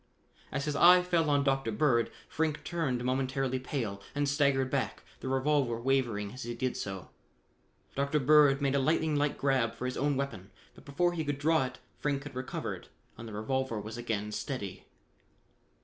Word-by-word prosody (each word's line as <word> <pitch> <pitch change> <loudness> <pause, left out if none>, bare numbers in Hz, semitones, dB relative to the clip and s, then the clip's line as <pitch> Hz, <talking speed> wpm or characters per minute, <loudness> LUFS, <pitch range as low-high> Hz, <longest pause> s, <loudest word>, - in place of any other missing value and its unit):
As 140 +2 -2
his 150 -1 -1
eye 180 +4 +7
fell 170 -3 +1
on 145 -1 +3
Dr. 135 -4 +1
Bird, 115 0 +2 0.2
Frink 155 -1 -1
turned 140 -8 -1
momentarily 130 0 0
pale 115 -7 -3
and 145 0 +1
staggered 140 -2 +2
back, 135 -2 -1 0.2
the - - -6
revolver 135 -3 +1
wavering 120 -6 0
as 130 - -8
he 120 -1 -4
did 130 +1 -1
so. 95 -2 -5 0.8
Dr. 140 +2 +1
Bird 145 0 +5
made 140 -1 +2
a 140 - +3
lightning 155 +2 +2
like 145 0 +1
grab 130 -4 +1
for 120 - -5
his 125 - -2
own 145 0 +1
weapon, 120 -9 -4 0.2
but - - -17
before 175 +5 +1
he 165 -2 -2
could 145 -2 -2
draw 155 -1 +3
it 125 0 -7 0.2
Frink 140 -1 -1
had 145 -1 -8
recovered 130 0 -5 0.3
and 115 0 -9
the 110 - -8
revolver 115 +2 -1
was 110 +2 -7
again 110 -3 -3
steady. 105 -2 -5
135 Hz, 180 wpm, -31 LUFS, 120-145 Hz, 0.8 s, eye